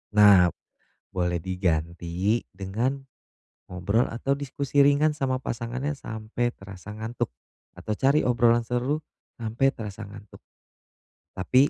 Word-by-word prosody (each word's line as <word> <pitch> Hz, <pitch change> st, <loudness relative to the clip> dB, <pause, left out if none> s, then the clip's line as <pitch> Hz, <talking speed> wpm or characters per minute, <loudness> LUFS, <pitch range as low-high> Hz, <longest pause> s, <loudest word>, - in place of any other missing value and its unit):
Nah, 100 Hz, -4 st, +8 dB, 0.6 s
boleh 90 Hz, -2 st, 0 dB
diganti 90 Hz, +3 st, 0 dB
dengan 115 Hz, +9 st, -2 dB, 0.6 s
ngobrol 95 Hz, +6 st, +1 dB
atau 125 Hz, +4 st, 0 dB
diskusi 140 Hz, 0 st, -2 dB
ringan 145 Hz, +2 st, +5 dB
sama 135 Hz, -3 st, 0 dB
pasangannya 125 Hz, +5 st, -3 dB
sampai 115 Hz, -2 st, -3 dB
terasa 95 Hz, +1 st, -10 dB
ngantuk, 110 Hz, +2 st, -3 dB, 0.5 s
atau 105 Hz, -, -3 dB
cari 135 Hz, +7 st, +3 dB
obrolan 120 Hz, -1 st, +4 dB
seru 125 Hz, +6 st, 0 dB, 0.4 s
sampai 115 Hz, +3 st, +1 dB
terasa 105 Hz, -1 st, -6 dB
ngantuk. 100 Hz, 0 st, -13 dB, 1.0 s
Tapi, 130 Hz, +10 st, +4 dB
115 Hz, 110 wpm, -26 LUFS, 95-130 Hz, 1.0 s, Nah